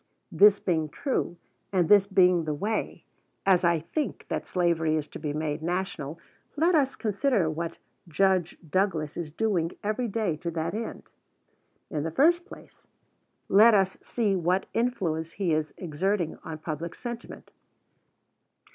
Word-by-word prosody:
This 205 Hz, 0 st, +6 dB
being 160 Hz, -6 st, -1 dB
true, 260 Hz, -, -2 dB, 0.3 s
and 180 Hz, -4 st, +2 dB
this 200 Hz, 0 st, +6 dB
being 180 Hz, -4 st, +4 dB
the 155 Hz, -1 st, -1 dB
way, 210 Hz, +8 st, -3 dB, 0.4 s
as 190 Hz, -2 st, +4 dB
I 170 Hz, -2 st, +3 dB
think, 295 Hz, -, -3 dB
that -, -, -3 dB
slavery 170 Hz, -3 st, +1 dB
is 155 Hz, -1 st, -2 dB
to -, -, -9 dB
be 150 Hz, -, -3 dB
made 150 Hz, 0 st, -2 dB
national, 170 Hz, -3 st, -3 dB, 0.4 s
let 335 Hz, +4 st, +3 dB
us 275 Hz, -4 st, +2 dB
consider 210 Hz, -, +1 dB
what 165 Hz, +1 st, -4 dB, 0.3 s
Judge 185 Hz, 0 st, +1 dB
Douglas 160 Hz, -3 st, 0 dB
is 165 Hz, -3 st, -5 dB
doing 180 Hz, -3 st, 0 dB
every 215 Hz, +4 st, -1 dB
day 205 Hz, -7 st, -1 dB
to 170 Hz, -, -4 dB
that 160 Hz, -1 st, -3 dB
end. 225 Hz, +2 st, -5 dB, 0.9 s
In 150 Hz, -, -1 dB
the 160 Hz, -, -2 dB
first 345 Hz, -, +3 dB
place, -, -, -14 dB, 0.6 s
let 215 Hz, +3 st, +7 dB
us 190 Hz, -1 st, +1 dB
see 215 Hz, -5 st, 0 dB
what 180 Hz, +2 st, +1 dB
influence 170 Hz, -9 st, -1 dB
he 185 Hz, -5 st, 0 dB
is 155 Hz, 0 st, -1 dB
exerting 175 Hz, +1 st, -1 dB
on 160 Hz, -, -6 dB
public 160 Hz, +1 st, -5 dB
sentiment. 240 Hz, -1 st, -8 dB
180 Hz, 145 wpm, -27 LUFS, 160-210 Hz, 0.9 s, let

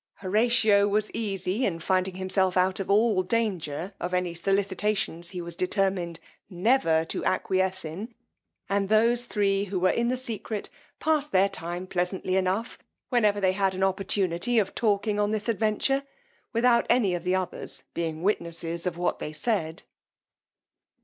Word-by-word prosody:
Horatio 210 Hz, 0 st, +3 dB
was 210 Hz, +1 st, 0 dB
easy 195 Hz, +1 st, -2 dB
in 180 Hz, -8 st, 0 dB
finding 185 Hz, +2 st, 0 dB
himself 185 Hz, 0 st, +1 dB
out 185 Hz, +1 st, +2 dB
of 195 Hz, -, -4 dB
all 210 Hz, -1 st, +4 dB
danger 185 Hz, -5 st, -2 dB
of 180 Hz, +1 st, -2 dB
any 180 Hz, -1 st, -1 dB
solicitations 195 Hz, -1 st, -1 dB
he 180 Hz, -2 st, -5 dB
was 170 Hz, -1 st, -7 dB
determined 185 Hz, -2 st, -1 dB, 0.3 s
never 175 Hz, -4 st, +2 dB
to -, -, -3 dB
acquiesce 190 Hz, -1 st, 0 dB
in; 190 Hz, +10 st, -6 dB, 0.6 s
and 195 Hz, 0 st, 0 dB
those 235 Hz, +3 st, +3 dB
three 200 Hz, -3 st, +1 dB
who 195 Hz, -1 st, -2 dB
were 185 Hz, +1 st, +3 dB
in 235 Hz, 0 st, 0 dB
the 255 Hz, +1 st, 0 dB
secret 225 Hz, -4 st, -5 dB, 0.3 s
passed 305 Hz, -2 st, +1 dB
their 190 Hz, +1 st, +4 dB
time 175 Hz, -1 st, -5 dB
pleasantly 185 Hz, +1 st, -1 dB
enough, 190 Hz, +5 st, -1 dB, 0.3 s
whenever 215 Hz, -5 st, +3 dB
they 190 Hz, -2 st, +3 dB
had 190 Hz, -1 st, +1 dB
an 190 Hz, -, -1 dB
opportunity 195 Hz, +2 st, +1 dB
of 200 Hz, -4 st, +2 dB
talking 210 Hz, -1 st, +1 dB
on 205 Hz, 0 st, +2 dB
this 215 Hz, +1 st, -2 dB
adventure, 225 Hz, +5 st, +1 dB, 0.5 s
without 235 Hz, 0 st, +3 dB
any 210 Hz, -7 st, +3 dB
of 175 Hz, -1 st, -3 dB
the 180 Hz, +1 st, +1 dB
others 185 Hz, -2 st, -4 dB
being 165 Hz, -1 st, -3 dB
witnesses 170 Hz, -3 st, -2 dB
of 175 Hz, -1 st, -3 dB
what 175 Hz, -, -1 dB
they 150 Hz, -, -4 dB
said. 160 Hz, 0 st, -2 dB
195 Hz, 155 wpm, -27 LUFS, 180-215 Hz, 0.6 s, all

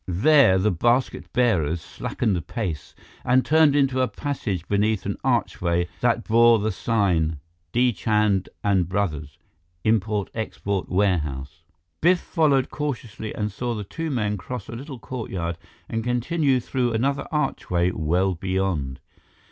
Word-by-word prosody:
There, 110 Hz, -, +5 dB
the 100 Hz, +3 st, +2 dB
basket 120 Hz, +9 st, 0 dB
bearers 85 Hz, -10 st, +2 dB
slackened 90 Hz, +2 st, -3 dB
pace 90 Hz, -, -4 dB, 0.3 s
and 125 Hz, +1 st, +3 dB
turned 155 Hz, -2 st, +5 dB
into 135 Hz, -2 st, +2 dB
a 130 Hz, -, +2 dB
passage 105 Hz, -, -4 dB
beneath 105 Hz, 0 st, +1 dB
an -, -, -2 dB
archway 85 Hz, 0 st, 0 dB
that 120 Hz, -1 st, +1 dB
bore 115 Hz, +1 st, +5 dB
the 110 Hz, +1 st, -1 dB
sign: 90 Hz, -7 st, +1 dB, 0.3 s
D. 125 Hz, 0 st, +3 dB
CHAND 105 Hz, -2 st, +1 dB, 0.2 s
& 95 Hz, -2 st, +3 dB
BROS. 75 Hz, -8 st, -2 dB, 0.5 s
Import 105 Hz, -2 st, +1 dB
Export 100 Hz, -3 st, -3 dB
Warehouse 75 Hz, -8 st, -1 dB, 0.4 s
Biff 175 Hz, +2 st, +4 dB
followed 145 Hz, -7 st, +1 dB
cautiously 120 Hz, -7 st, -4 dB
and 105 Hz, -1 st, -2 dB
saw 120 Hz, +3 st, -3 dB
the 105 Hz, -, -4 dB
two 160 Hz, +11 st, -5 dB
men 105 Hz, -6 st, -1 dB
cross 110 Hz, +2 st, -6 dB
a -, -, -8 dB
little 135 Hz, +2 st, -7 dB
courtyard 95 Hz, -9 st, -5 dB, 0.3 s
and 115 Hz, 0 st, -3 dB
continue 130 Hz, +3 st, +1 dB
through 125 Hz, -1 st, -1 dB
another 140 Hz, +5 st, 0 dB
archway 90 Hz, -, 0 dB
well 90 Hz, +4 st, +1 dB
beyond. 90 Hz, -7 st, -2 dB
110 Hz, 135 wpm, -24 LUFS, 90-125 Hz, 0.5 s, There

